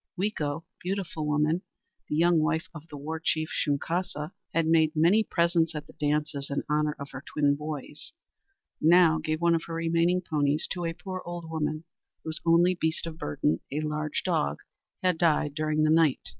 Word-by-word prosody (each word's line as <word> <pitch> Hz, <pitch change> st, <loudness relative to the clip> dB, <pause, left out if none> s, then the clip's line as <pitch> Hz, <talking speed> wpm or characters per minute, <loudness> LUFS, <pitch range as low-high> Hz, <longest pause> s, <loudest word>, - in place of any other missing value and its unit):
Weeko 165 Hz, -6 st, -1 dB, 0.2 s
(Beautiful 180 Hz, -5 st, -3 dB
Woman), 150 Hz, +3 st, +1 dB, 0.5 s
the -, -, 0 dB
young 170 Hz, +1 st, +4 dB
wife 160 Hz, +1 st, 0 dB
of 155 Hz, 0 st, -10 dB
the 145 Hz, -, -8 dB
war 155 Hz, +3 st, -4 dB
chief 155 Hz, 0 st, 0 dB
Shunkaska, 150 Hz, +1 st, -1 dB
who -, -, -35 dB, 0.2 s
had 165 Hz, 0 st, +1 dB
made 160 Hz, 0 st, +3 dB
many 175 Hz, +8 st, +4 dB
presents 170 Hz, -3 st, +1 dB
at 150 Hz, 0 st, -5 dB
the -, -, -16 dB
dances 150 Hz, -1 st, -1 dB
in 140 Hz, -, -1 dB
honor 150 Hz, 0 st, +1 dB
of 140 Hz, 0 st, -7 dB
her 135 Hz, -, -7 dB
twin 145 Hz, -2 st, +1 dB
boys, 150 Hz, 0 st, -6 dB, 0.7 s
now 165 Hz, -1 st, +6 dB
gave 155 Hz, 0 st, -2 dB
one 170 Hz, 0 st, +4 dB
of 165 Hz, -, 0 dB
her 165 Hz, -, -4 dB
remaining 165 Hz, +2 st, +2 dB
ponies 145 Hz, -1 st, +1 dB
to 175 Hz, -2 st, -2 dB
a 165 Hz, -, -1 dB
poor 185 Hz, +2 st, -6 dB
old 175 Hz, -1 st, -6 dB
woman 155 Hz, -1 st, -2 dB, 0.4 s
whose 160 Hz, +1 st, -3 dB
only 170 Hz, +2 st, +5 dB
beast 160 Hz, -2 st, -1 dB
of 165 Hz, -1 st, -7 dB
burden, 75 Hz, +2 st, 0 dB
a 150 Hz, +2 st, -1 dB
large 150 Hz, 0 st, -2 dB
dog, 70 Hz, +1 st, +1 dB, 0.5 s
had 180 Hz, -3 st, +2 dB
died 155 Hz, -4 st, +2 dB
during 155 Hz, 0 st, 0 dB
the 155 Hz, -, +4 dB
night. 160 Hz, -4 st, +3 dB
160 Hz, 185 wpm, -28 LUFS, 150-170 Hz, 0.7 s, now